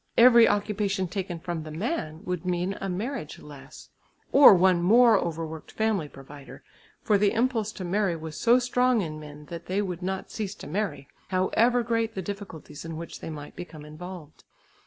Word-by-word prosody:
Every 235 -1 +8
occupation 205 -2 0
taken 180 -2 -4
from 170 -1 -4
the 155 - -8
man 160 - -3
would 180 -2 -3
mean 180 +1 -1
a 195 - -2
marriage 210 - -4
less 140 -2 -13 0.4
or 275 -7 +9
one 180 -1 +4
more 225 +3 +6
overworked 160 -1 -5
family 215 -8 0
provider, 135 0 -12 0.4
for 210 -2 +3
the 205 0 +3
impulse 230 -3 0
to 185 - -6
marry 190 0 +1
was 160 -1 -7
so 240 +1 +4
strong 250 -2 +2
in 155 -2 -6
men 150 0 -11
that 170 0 -7
they 190 +2 0
would 185 -3 -3
not 190 +1 -4
cease 210 -2 -4
to - - -11
marry, 180 -3 -3 0.2
however 225 +6 +2
great 230 -1 -1
the 190 - -3
difficulties 195 -7 -8
in 165 -1 -6
which 170 0 -8
they - - -7
might 150 -2 -8
become 160 -4 -9
involved. 155 0 -10
185 Hz, 180 wpm, -27 LUFS, 160-215 Hz, 0.4 s, or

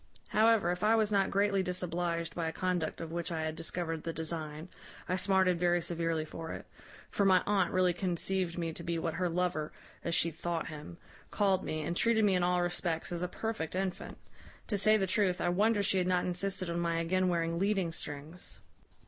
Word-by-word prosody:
However, 215 -5 +4
if 180 +3 -3
I 220 +2 +5
was 215 -1 +2
not 195 -2 +3
greatly 200 0 +2
disobliged 175 -2 -2
by 165 -2 -2
a - - -1
conduct 180 -2 -1
of 165 -1 -6
which 170 +1 -3
I 160 -1 -2
had 155 0 -2
discovered 165 0 -3
the 165 - -3
design, 160 0 -5 0.4
I 185 - +1
smarted 185 -2 +3
very 175 0 +3
severely 165 -2 -1
for 160 +1 -6
it; - - -7 0.5
for 200 - +1
my 190 -2 +5
aunt 205 -1 +2
really 185 -1 +3
conceived 180 -1 -1
me 165 -2 -2
to 170 - -8
be 170 0 -2
what 165 -1 -2
her 180 0 0
lover 170 -3 -1 0.3
(as 170 - 0
she 170 - +3
thought 165 +1 -3
him) 155 +2 -9 0.3
called 195 -3 +2
me, 155 0 -3
and 170 - -2
treated 220 +1 +3
me 200 - +4
in 180 - +2
all 180 0 +2
respects 175 -2 -2
as 175 -1 -2
a 180 - 0
perfect 180 -4 -3
infant. 190 -1 -3 0.5
To 215 - +1
say 215 +2 +5
the 195 - +1
truth, 190 -2 +1
I 175 - +1
wonder 205 +3 +3
she 190 -1 +2
had 180 - 0
not 180 -1 +2
insisted 185 +1 -1
on 170 0 -2
my 170 -1 0
again 185 +3 +1
wearing 170 -1 0
leading 195 -3 +1
strings. 155 +2 -7
175 Hz, 210 wpm, -32 LUFS, 165-190 Hz, 0.5 s, I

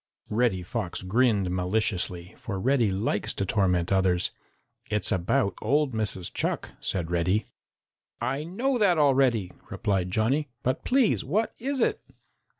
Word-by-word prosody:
Reddy 105 -5 +1
Fox 95 -1 -4
grinned 105 -2 +2
maliciously, 90 -1 -1
for 100 -4 -5
Reddy 120 0 +2
likes 100 +2 -1
to 100 - -1
torment 90 -4 +1
others. 95 -2 +2 0.6
"It's 105 0 -1
about 95 +2 +1
old 140 +3 +1
Mrs. 105 -5 -3
Chuck," - - -2
said 85 -3 -2
Reddy. 90 +5 +1 0.7
"I 130 +5 -1
know 245 - -1
that 190 -5 +4
already," 130 -9 +3 0.2
replied 95 -3 -1
Johnny, 130 +9 +1
"but, 130 - -1
please, 255 -3 +2
what 220 +2 0
is 270 +1 -2
it?" - - +1
110 Hz, 135 wpm, -27 LUFS, 95-135 Hz, 0.7 s, that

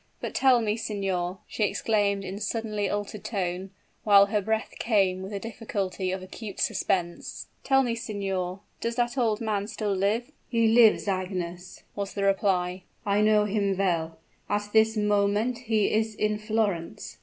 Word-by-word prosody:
But - - -5
tell 260 -3 +4
me, 215 -1 0
signor," 190 -4 -2
she - - -7
exclaimed, 205 -2 +1
in 190 +2 -5
suddenly 210 -1 -2
altered 205 0 -4
tone, 185 -2 -3 0.3
while 200 -2 +7
her 205 +1 0
breath 220 +2 -1
came 195 -5 +2
with 190 +2 -6
the 200 - -3
difficulty 200 -4 -3
of 190 0 -4
acute 200 +2 -8
suspense, 175 -3 -1 0.2
"tell 270 0 +4
me, 240 -2 0
signor, 195 -4 -3 0.2
does 230 0 -2
that 240 0 0
old 225 -4 +1
man 210 -3 -1
still 210 -2 -2
live?" 205 +5 0 0.2
"He 230 -2 +3
lives, 225 -2 +5
Agnes," 180 -2 -4
was 200 -1 -4
the 200 - -1
reply. 190 -2 +1 0.2
"I 205 0 +2
know 210 0 +4
him 200 -2 0
well; 165 -4 0 0.3
at 205 +1 -1
this 220 0 +4
moment 210 +3 +1
he 215 -2 +2
is 220 0 +1
in 210 0 0
Florence!" 215 -6 -2
205 Hz, 160 wpm, -27 LUFS, 190-220 Hz, 0.3 s, while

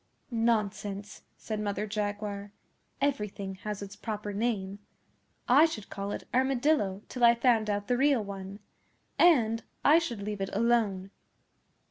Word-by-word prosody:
'Nonsense!' 210 -3 -1 0.2
said 215 -2 -4
Mother 205 0 -2
Jaguar. 205 -1 -3 0.5
'Everything 210 -8 -2
has 210 -1 -4
its 200 0 -9
proper 210 -1 -5
name. 200 -3 -2 0.7
I 280 +6 +7
should 225 -11 -5
call 200 0 -4
it - - -6
"Armadillo" 255 -6 +1
till 250 - -4
I 235 0 +8
found 230 -3 +2
out 205 0 -1
the 245 - +1
real 270 -4 +3
one. 195 0 -7 0.6
And 230 -10 +5 0.2
I 310 +3 +7
should 235 -12 -4
leave 205 -1 -4
it 195 - -1
alone. 205 -4 +1
210 Hz, 135 wpm, -29 LUFS, 200-240 Hz, 0.7 s, I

